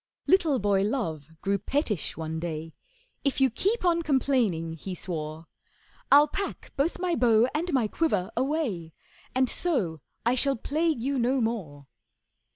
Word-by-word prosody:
Little 330 -7 +4
boy 200 -3 +2
Love 195 - -2
grew 200 0 0
pettish 220 - -1
one 160 0 -3
day; 160 -1 -5 0.5
'If 275 -2 0
you 265 -2 +4
keep 400 - 0
on 340 -1 +3
complaining,' 250 - +1
he 180 +3 -6
swore, 160 -2 -5 0.7
'I'll 290 +1 +8
pack 395 +6 -4
both 290 +5 0
my 360 -1 -1
bow 235 -3 +4
and 340 +4 -1
my 255 -6 +2
quiver 210 - 0
away, 245 - -1 0.4
And 260 0 +3
so 205 - 0 0.2
I 240 - +4
shall 275 +2 +2
plague 305 +1 -1
you 275 0 0
no 255 +3 +2
more. 190 - -3
235 Hz, 150 wpm, -27 LUFS, 175-290 Hz, 0.7 s, I'll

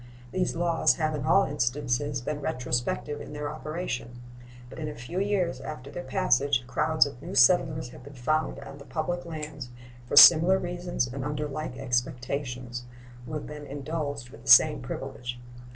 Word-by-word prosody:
These 185 -2 -1
laws 170 -1 +2
have 155 -1 -1
in 140 -3 -3
all 195 - +5
instances 135 -1 -1
been 145 +4 -4
retrospective 140 +1 -2
in 150 - -9
their 150 0 -4
operation, 130 -5 -5 0.5
but 130 - -11
in 155 - -3
a 150 - -7
few 125 +10 -5
years 195 -3 0
after 140 -2 -8
their 175 - -5
passage 140 -8 +1
crowds 155 +5 +2
of 140 -3 -8
new 175 +5 -7
settlers 155 -6 +4
have - - -13
been 140 0 -12
found 155 +6 -1
on 140 0 -10
the 140 - -12
public 175 +2 -3
lands 150 -5 -7 0.4
for - - -2
similar 170 +5 +9
reasons 175 -6 -2
and 130 +2 -6
under 150 +1 -3
like 145 -2 -5
expectations, 125 0 -3 0.4
who - - -7
have 150 - -4
been 150 -1 -9
indulged 145 -3 -5
with - - -13
the 135 - -7
same 150 +5 +7
privilege. 125 -1 -6
145 Hz, 170 wpm, -27 LUFS, 125-160 Hz, 0.5 s, similar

